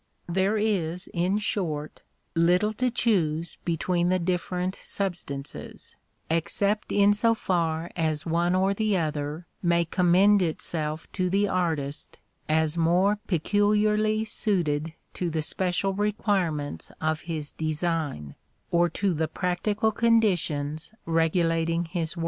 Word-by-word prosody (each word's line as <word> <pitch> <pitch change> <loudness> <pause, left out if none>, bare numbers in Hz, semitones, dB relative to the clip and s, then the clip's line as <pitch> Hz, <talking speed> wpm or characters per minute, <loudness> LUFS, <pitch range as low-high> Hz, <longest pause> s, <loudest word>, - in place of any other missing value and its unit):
There 190 +4 +1
is, 180 -5 0
in 180 +3 +1
short, 160 -8 -2 0.3
little 180 +6 +3
to 250 +4 0
choose 170 -9 0
between 175 +1 0
the 185 - +3
different 180 +1 -1
substances, 170 -8 -5 0.3
except 200 +6 0
in 205 0 +5
so 230 +2 +2
far 170 -4 -1
as 155 -2 -1
one 170 +2 +1
or 190 +1 +2
the 210 -1 +1
other 155 0 -3 0.2
may 170 -1 +2
commend 185 +4 +4
itself 155 -2 -2
to 185 -2 -1
the 200 +2 +2
artist 160 -7 -2 0.3
as 160 0 +2
more 185 +5 +3
peculiarly 210 +4 +2
suited 165 -8 0 0.2
to 180 - -2
the 160 -1 -1
special 185 +3 0
requirements 190 - -1
of 155 0 -1
his 155 -3 -3
design, 155 - -2 0.4
or 175 0 +3
to 195 +3 0
the 160 0 0
practical 200 +6 0
conditions 180 -8 +1
regulating 165 0 +1
his 165 +1 -3
work. - - -4
175 Hz, 120 wpm, -26 LUFS, 160-200 Hz, 0.4 s, in